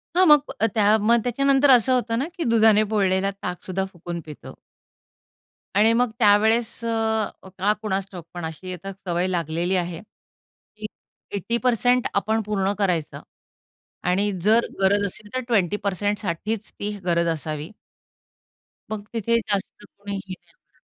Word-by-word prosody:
हां. 370 +1 +5
मग 295 -1 +5
अ, - - +5
त्या 210 0 +4
मग 235 +3 +4
त्याच्यानंतर 275 +3 +3
असं 255 +1 +5
होतं 235 -2 0
ना, 270 - 0
की 340 - -2
दुधाने 220 -3 +4
पोळलेला 195 -1 +2
ताक 180 -1 -5
सुद्धा 190 +1 -2
फुकून 175 -1 -7
पितो. 150 -2 -10 1.2
आणि 215 +3 +5
मग 245 0 +2
त्यावेळेस 220 +2 +3
अ, 220 -1 0 0.3
का 200 +3 +2
कुणास 195 -2 -2
ठाऊक, 175 -4 -9
पण 175 -2 -5
अशी 185 +3 -6
आता 180 +2 -7
सवय 180 -2 -2
लागलेली 175 +1 -1
आहे 175 -2 -2 0.8
की 215 - -6 0.5
80% 245 +3 +1
आपण 220 +3 0
पूर्ण 200 -2 0
करायचं. 180 -6 -1 0.8
आणि 195 +3 +1
जर 220 +3 +4 0.2
गरज 200 +1 +3
असेल, 205 +2 -6
तर 255 - 0
20% 205 +1 0
साठीच 210 +4 -3
ती 205 +1 -4
गरज 170 -1 +2
असावी. 155 +2 -5 1.2
मग 215 -1 -4
तिथे 230 +1 +1
जास्त 210 -1 -3
कोणी 200 0 -8
हे 195 -1 -6
नाही 185 - -15
होणार. - - -39
205 Hz, 145 wpm, -23 LUFS, 185-225 Hz, 1.2 s, हां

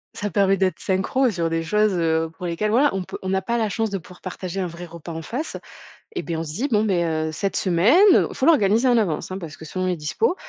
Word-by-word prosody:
Ça 205 0 -3
permet 195 +1 +3
d'être 190 -1 0
synchro 195 +7 +1
sur 170 -5 -1
des 165 0 -1
choses, 210 +4 +2
heu, 160 -2 0
pour 180 - -5
lesquelles 210 +6 -1
voilà 280 +5 +4
on 190 - -2
peut - - -7
on 190 0 -2
a 190 - +1
pas 235 +5 -1
la 220 -2 0
chance 225 +1 -1
de 195 - -1
pouvoir 180 +1 -15
partager 185 0 -5
un 190 - 0
vrai 170 0 -7
repas 170 0 -9
en 165 0 -5
face, 250 - -4 0.6
eh 370 - -2
beh, 170 - -3
on 165 - -3
se 150 - -6
dit: 240 - -2
«Bon 215 -2 +3
beh, 180 -5 +1
heu, 160 -1 -1
cette 195 +5 -2
semaine», 185 - +3 0.4
faut 260 - -2
l'organiser 235 -5 +4
en 240 -1 +4
avance, 180 -8 -1
hein, 185 - -4
parce 165 -5 -8
que - - -11
selon 185 +4 -3
les 180 -1 0
dispos: 160 - 0
185 Hz, 265 wpm, -23 LUFS, 165-215 Hz, 0.6 s, voilà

